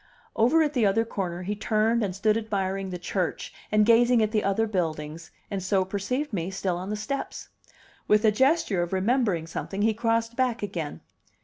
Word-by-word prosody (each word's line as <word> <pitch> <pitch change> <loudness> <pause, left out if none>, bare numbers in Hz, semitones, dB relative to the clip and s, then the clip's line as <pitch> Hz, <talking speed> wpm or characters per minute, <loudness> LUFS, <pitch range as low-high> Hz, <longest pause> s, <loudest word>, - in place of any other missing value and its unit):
Over 300 +9 +4
at 300 -1 -1
the 245 -5 +1
other 210 +3 +3
corner 180 -5 -4
he 205 +3 -2
turned 220 +2 +1
and 185 -3 -2
stood 210 +2 +2
admiring 195 -3 -2
the 180 - -4
church 180 0 -3 0.2
and 215 0 +4
gazing 235 +1 +5
at 215 - 0
the 215 -2 +1
other 200 +3 +1
buildings, 160 -5 -3 0.2
and 195 -1 -2
so 190 +1 +1
perceived 230 +9 -3
me 175 -2 -2
still 190 -2 -2
on 185 +2 -6
the 210 - -1
steps. 275 +7 -5 0.6
With 210 +1 +4
a 215 - +6
gesture 265 - +2
of 175 +1 -3
remembering 195 -4 +1
something 195 +4 -4
he 220 0 +3
crossed 230 +1 0
back 245 -4 0
again. 165 - -4
210 Hz, 190 wpm, -26 LUFS, 185-230 Hz, 0.6 s, a